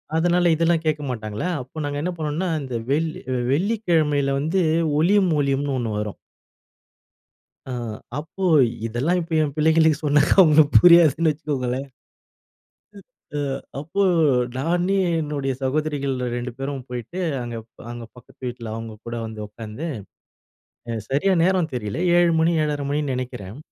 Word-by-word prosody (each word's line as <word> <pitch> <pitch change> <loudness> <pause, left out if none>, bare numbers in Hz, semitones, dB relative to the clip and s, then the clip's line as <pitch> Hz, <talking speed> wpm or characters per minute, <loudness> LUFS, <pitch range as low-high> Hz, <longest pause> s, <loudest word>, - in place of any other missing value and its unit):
அதனால 175 +1 +3
இதெல்லாம் 165 0 +1
கேட்க 155 -1 0
மாட்டாங்களா, 110 +2 -4
அப்போ 130 +5 -8
நாங்க 145 0 -3
என்ன 180 +4 -1
பண்ணோம்னா 155 +4 -2
இந்த 130 -3 -5 0.2
வெள்ளி 155 +2 0 0.3
வெள்ளிக்கிழமையில 155 -6 +1
வந்து 160 +6 0 0.4
ஒளியும் 190 +2 +3
ஒலியம்னு 140 0 0
ஒண்ணு 120 -3 -2
வரும். 105 -1 -4 1.5
ஆ. 130 - -7 0.5
அப்போ 160 +5 -8 0.4
இதெல்லாம் 135 +11 0
இப்போ 165 0 -6
என் 145 -2 -3
பிள்ளைங்களுக்கு 160 0 +3
சொன்னாக்கா 145 0 +3
அவங்களுக்கு 155 -3 +6
புரியாதுன்னு 165 -2 +6
வச்சுக்கோங்களேன். 140 -3 -3 1.1
அ 195 -7 -10 0.4
அப்போ 165 +7 -2 0.6
நான் 170 +6 0 0.4
என்னுடைய 145 -3 -2
சகோதரிகள் 140 0 -1 0.2
2 120 +1 -4
பேரும் 135 -1 -5
போயிட்டு 125 +8 -6 0.2
அங்க, 120 -1 -6 0.4
அங்க 120 0 -7
பக்கத்து 125 +1 -18
வீட்ல 120 -2 -6
அவங்க 115 -1 -7
கூட 115 - -4
வந்து 110 -1 -6
உட்கார்ந்து 110 +8 -7 1.2
சரியா 150 +9 +2
நேரம் 180 -3 +1
தெரியல. 105 +3 -3 0.2
7:00 175 -1 +4
மணி, 165 +1 +3
7:30 145 -2 -2
மணின்னு 145 -2 -1
நினைக்கிறன். 125 -4 -6
145 Hz, 125 wpm, -23 LUFS, 125-165 Hz, 1.5 s, அவங்களுக்கு